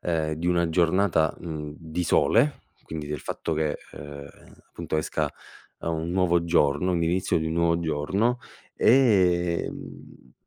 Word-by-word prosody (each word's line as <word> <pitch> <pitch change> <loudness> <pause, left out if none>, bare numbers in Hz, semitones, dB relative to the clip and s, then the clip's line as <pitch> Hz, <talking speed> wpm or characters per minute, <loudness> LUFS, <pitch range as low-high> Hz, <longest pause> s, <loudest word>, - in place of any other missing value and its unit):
ehm, 80 -2 -1
di 85 +3 -4
una 85 -1 +2
giornata, 85 0 +2
mhmm, 75 -3 -6
di 80 +1 -4
sole, 125 - +2 0.2
quindi 80 -2 -6
del 75 -2 -4
fatto 80 - -4
che, 75 -1 0 0.2
ehm, - - -10 0.3
ehm, - - -19 0.2
appunto 80 - -4
esca, 75 - -1 0.5
uhm, 85 - -3
un 85 +2 -4
nuovo 90 -2 +2
giorno, 80 +2 +2
l'inizio 85 +2 +1
di 80 - -2
un 80 - -2
nuovo 85 0 +2
giorno, 95 +10 0 0.4
ehm, 90 -9 +1
85 Hz, 145 wpm, -26 LUFS, 80-90 Hz, 0.5 s, una